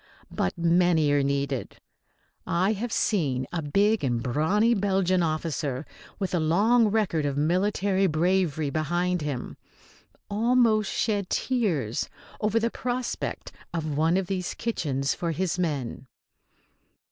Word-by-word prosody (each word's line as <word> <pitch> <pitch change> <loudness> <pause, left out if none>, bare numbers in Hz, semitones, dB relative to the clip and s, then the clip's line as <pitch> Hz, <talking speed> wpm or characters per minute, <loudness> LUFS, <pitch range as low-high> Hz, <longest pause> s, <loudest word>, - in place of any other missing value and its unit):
But 90 - -1
many 170 -3 +3
are 145 0 +3
needed. 140 -1 -2 0.7
I 185 +5 +2
have 225 +3 -4
seen 140 - 0
a 170 - -1
big 200 +8 +2
and 120 -3 0
brawny 185 - +2
Belgian 190 -3 +1
officer, 155 -4 -2 0.3
with 190 -3 -3
a 175 - +2
long 210 +9 +3
record 205 -7 +1
of 140 -1 -1
military 190 +4 +1
bravery 160 -3 +1
behind 175 +4 0
him, 145 -4 -4 0.7
almost 220 -1 +2
shed 205 -4 -1
tears 175 - -1 0.3
over 215 +1 +1
the 230 +1 0
prospect 250 0 -3 0.2
of 155 -3 -2
one 160 +4 +2
of 190 - 0
these 180 -1 -3
kitchens 140 - -1
for 170 -1 -2
his 180 +2 -1
men. 140 -7 -3
175 Hz, 125 wpm, -26 LUFS, 150-205 Hz, 0.7 s, many